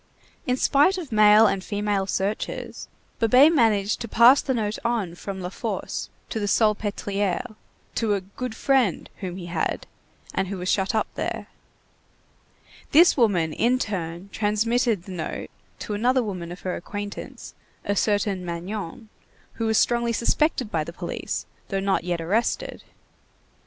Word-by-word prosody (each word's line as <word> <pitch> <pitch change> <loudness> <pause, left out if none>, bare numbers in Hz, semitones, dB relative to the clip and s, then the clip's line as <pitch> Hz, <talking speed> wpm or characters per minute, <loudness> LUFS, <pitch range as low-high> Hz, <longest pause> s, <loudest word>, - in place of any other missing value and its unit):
In 250 0 +1
spite 295 +9 +4
of 325 -8 -6
male 215 0 +7
and 195 -2 +1
female 205 -1 -1
searchers, 195 +2 -3 0.3
Babet 255 +8 +6
managed 215 -7 +2
to 235 - -4
pass 240 +5 +6
the 265 - -1
note 215 -2 -2
on 230 -7 -1
from 190 +2 -6
La 180 - -4
Force - - -4 0.2
to 220 - -2
the 205 - -1
Salpêtrière, 205 0 0 0.4
to 215 -3 +1
a 195 - -2
"good 220 +5 -6
friend" 255 -7 +1
whom 185 -3 -5
he 180 - -7
had 175 - -2 0.5
and 190 - 0
who 195 +1 -4
was 180 0 -3
shut 195 +3 +1
up 220 - +2
there. - - -4 1.4
This 340 +4 +6
woman 185 - +2
in 245 +2 +2
turn 180 -5 -4
transmitted 220 0 +1
the 190 - -10
note 170 -4 -5 0.3
to 210 - -5
another 250 +5 +2
woman 180 -5 -5
of 180 - -9
her 185 - -2
acquaintance, 205 +3 -7 0.3
a 205 - 0
certain 205 -2 +1
Magnon, 185 +5 -5 0.4
who 225 - -2
was 220 0 +2
strongly 235 -1 +2
suspected 250 0 +1
by 160 -2 0
the 170 - -7
police, - - -4 0.2
though 195 - -1
not 195 -2 +1
yet 175 -1 -2
arrested. 200 +9 -1
210 Hz, 150 wpm, -24 LUFS, 190-235 Hz, 1.4 s, male